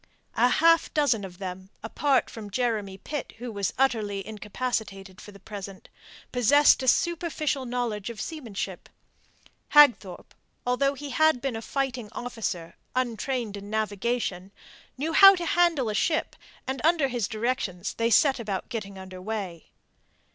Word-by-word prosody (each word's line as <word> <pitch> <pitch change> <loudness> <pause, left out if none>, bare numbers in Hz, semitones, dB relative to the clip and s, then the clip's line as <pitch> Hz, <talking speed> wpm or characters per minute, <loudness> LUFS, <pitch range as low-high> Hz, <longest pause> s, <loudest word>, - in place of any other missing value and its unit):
A 240 - +4
half 330 +4 +4
dozen 265 -9 +2
of 180 -2 -9
them, 185 0 -7
apart 265 +4 +1
from 215 -3 -9
Jeremy 210 -4 -1
Pitt, 285 +7 -6
who 240 +1 -6
was 200 -3 -2
utterly 215 -7 0
incapacitated 210 -2 -4
for 210 - -11
the 200 - -15
present, 195 -1 -9 0.4
possessed 280 +4 +5
a 260 - -3
superficial 315 -3 0
knowledge 235 -5 -2
of 230 -3 -8
seamanship. 250 -11 -6 0.9
Hagthorpe, 245 -11 +5 0.3
although 275 +3 +1
he 285 +1 -7
had 315 0 +3
been 270 -2 -3
a 225 - -4
fighting 255 -3 -3
officer, 210 -9 -5 0.2
untrained 240 -2 -2
in 200 0 -9
navigation, 215 -2 -2 0.5
knew 310 +5 -2
how 390 +3 +9
to 350 -2 -4
handle 335 -7 +2
a 215 - -1
ship, 315 +8 0 0.3
and 265 0 -3
under 320 -3 +3
his 240 -6 -2
directions 220 -5 -2
they 230 0 0
set 270 +2 +4
about 205 -5 -4
getting 205 -5 -5
under 185 -1 -9
way. 190 -5 -5
235 Hz, 145 wpm, -26 LUFS, 200-270 Hz, 0.9 s, how